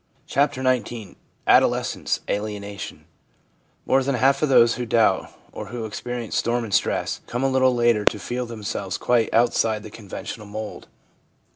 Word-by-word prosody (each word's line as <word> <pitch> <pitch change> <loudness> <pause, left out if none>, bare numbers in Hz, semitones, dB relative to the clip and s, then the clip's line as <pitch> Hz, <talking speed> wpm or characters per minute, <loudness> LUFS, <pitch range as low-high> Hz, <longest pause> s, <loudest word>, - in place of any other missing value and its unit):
CHAPTER 140 -1 +1
XIX 120 -5 -1 0.3
ADOLESCENCE— - - +2
ALIENATION 105 -1 -4 0.8
MORE 135 - +3
than 135 0 0
half 135 +2 +3
of 155 - +2
those 120 -3 +6
who 125 - -3
doubt, 110 -4 +2 0.2
or - - -7
who 120 -2 -5
experience 120 +1 -5
storm 120 +1 +1
and 105 -3 -6
stress, 95 - 0
come 120 +2 -2
a - - +4
little 130 -1 +3
later 120 -3 +3
to - - +3
feel 120 +4 -4
themselves 100 -4 -4
quite 120 -2 +2
outside 115 -2 +2
the 110 - -10
conventional 105 0 -8
mould. 110 +1 -7
115 Hz, 150 wpm, -23 LUFS, 105-125 Hz, 0.8 s, those